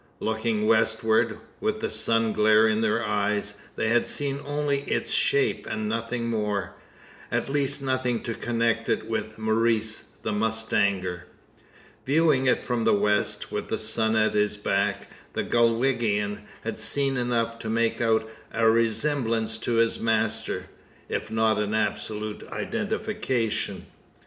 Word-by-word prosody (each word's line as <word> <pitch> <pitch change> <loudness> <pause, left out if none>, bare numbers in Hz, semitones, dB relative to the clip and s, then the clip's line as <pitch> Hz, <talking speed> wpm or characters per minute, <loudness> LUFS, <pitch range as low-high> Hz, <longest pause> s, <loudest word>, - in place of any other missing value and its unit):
Looking 110 -1 -1
westward, 110 0 +2 0.2
with 215 0 -1
the 220 - -2
sun 115 -1 +1
glare 110 +1 +5
in 110 0 +1
their 110 +1 +1
eyes, 105 0 -1
they 110 - 0
had 120 +1 +2
seen 140 -1 0
only 145 -1 0
its - - 0
shape, 140 - +2
and 110 0 -2
nothing 115 +2 -2
more 105 -3 -2 0.6
at - - -1
least 140 0 0
nothing 130 -3 -1
to 115 - -3
connect 115 -1 -1
it 110 - 0
with 110 -1 -3
Maurice 110 0 0 0.2
the 110 - -1
mustanger. 100 -4 0 0.8
Viewing 145 -2 +3
it - - +2
from 120 -2 -1
the 110 -1 +4
west, 105 0 0
with - - -3
the - - -1
sun 110 0 +2
at 110 0 +2
his 105 0 +1
back, 100 -1 -1 0.3
the - - -1
Galwegian 115 -4 +1 0.2
had - - -4
seen 140 -1 +3
enough 115 -2 -1
to 110 - -5
make 115 +1 0
out 110 -1 +2 0.2
a 115 0 +2
resemblance 115 0 +2
to 120 - -2
his 115 0 +2
master 115 0 0 0.4
if - - -3
not 110 -1 +2
an 105 +1 -1
absolute 110 -1 -2
identification. 110 -5 -2
110 Hz, 140 wpm, -26 LUFS, 110-120 Hz, 0.8 s, glare